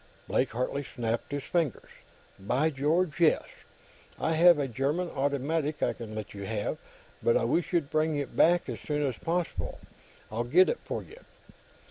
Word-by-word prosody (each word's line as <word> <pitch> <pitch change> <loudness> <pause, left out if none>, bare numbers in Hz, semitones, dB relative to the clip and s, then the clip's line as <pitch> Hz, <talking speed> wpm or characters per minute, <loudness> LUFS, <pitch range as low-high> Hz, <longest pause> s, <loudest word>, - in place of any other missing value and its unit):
Blake 130 - +1
Hartley 125 +4 -2
snapped 115 -1 -3
his 145 -1 -3
fingers. 160 -3 -1 0.5
"By 130 +11 +1
George, 155 +5 +1
yes! 165 -2 +4 0.8
I 160 - +1
have 170 +1 +7
a 140 -2 0
German 140 +8 -1
automatic 145 +3 -1
I - - +2
can 110 -2 -8
let 110 -1 -6
you 100 -1 -7
have, 105 0 -2 0.4
but 475 +1 +4
I - - 0
wish 175 - +1
you'd 165 -6 0
bring 155 -1 +1
it 140 -2 -4
back 175 +1 +4
as - - -5
soon 150 -1 -1
as 130 -4 -3
possible. 175 +1 -2 0.5
I'll 115 +2 -1
get 175 +10 +5
it - - -1
for - - -5
you." 455 - -14
145 Hz, 170 wpm, -29 LUFS, 125-170 Hz, 0.8 s, have